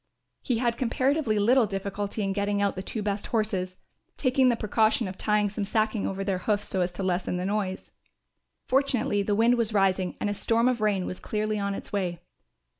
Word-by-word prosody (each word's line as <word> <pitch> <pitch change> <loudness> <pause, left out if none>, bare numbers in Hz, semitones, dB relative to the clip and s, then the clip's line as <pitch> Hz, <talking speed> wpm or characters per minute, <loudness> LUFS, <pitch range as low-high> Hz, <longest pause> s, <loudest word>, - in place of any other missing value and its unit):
He 245 - 0
had 235 0 0
comparatively 260 -1 +1
little 230 +3 +4
difficulty 200 +2 -3
in 195 0 0
getting 200 0 0
out 200 -1 +1
the 185 - -4
two 210 +2 -4
best 200 0 -2
horses, 195 -5 -1 0.4
taking 255 -1 +3
the 240 - +3
precaution 220 +2 +1
of 185 - -6
tying 210 +1 +1
some 205 +1 -3
sacking 215 +1 0
over 195 0 -3
their 195 -2 -1
hoofs 205 +2 -1
so 190 - 0
as 175 0 0
to 190 - -4
lessen 180 -1 -1
the 180 - -2
noise. 195 -2 -2 0.7
Fortunately 255 -6 +1
the 205 +1 0
wind 235 +3 +4
was 225 -2 0
rising 190 -2 +1
and - - -1
a 205 - 0
storm 230 +3 +1
of 250 -3 +1
rain 200 -4 +1
was 185 - -5
clearly 215 0 -2
on 200 0 -1
its - - -9
way. 180 -4 -1
205 Hz, 200 wpm, -27 LUFS, 195-225 Hz, 0.7 s, little